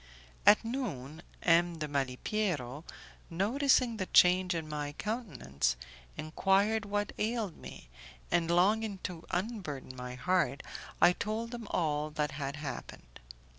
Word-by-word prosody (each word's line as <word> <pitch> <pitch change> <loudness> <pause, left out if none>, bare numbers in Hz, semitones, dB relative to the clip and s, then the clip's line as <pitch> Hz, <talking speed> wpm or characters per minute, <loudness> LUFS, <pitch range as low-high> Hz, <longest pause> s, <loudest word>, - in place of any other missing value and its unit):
At 210 +2 +7
noon, 165 - -4 0.2
M. 170 0 +4
de 155 -1 -3
Malipiero, 140 - -2 0.5
noticing 235 +6 +2
the 190 - -2
change 180 0 +5
in 160 -2 -3
my 150 -1 -4
countenance, 135 - -2 0.4
enquired 195 +7 +2
what 205 0 -1
ailed 215 -5 -1
me, - - -11 0.4
and 170 -1 +2
longing 200 +4 +3
to 170 -2 -5
unburden 175 - -3
my 125 0 -6
heart, 140 -3 +1 0.4
I 175 - +7
told 225 +5 -3
him 235 -3 -6
all 150 -2 0
that 150 -1 -1
had 140 0 -4
happened. 135 - -8
175 Hz, 125 wpm, -32 LUFS, 145-210 Hz, 0.5 s, At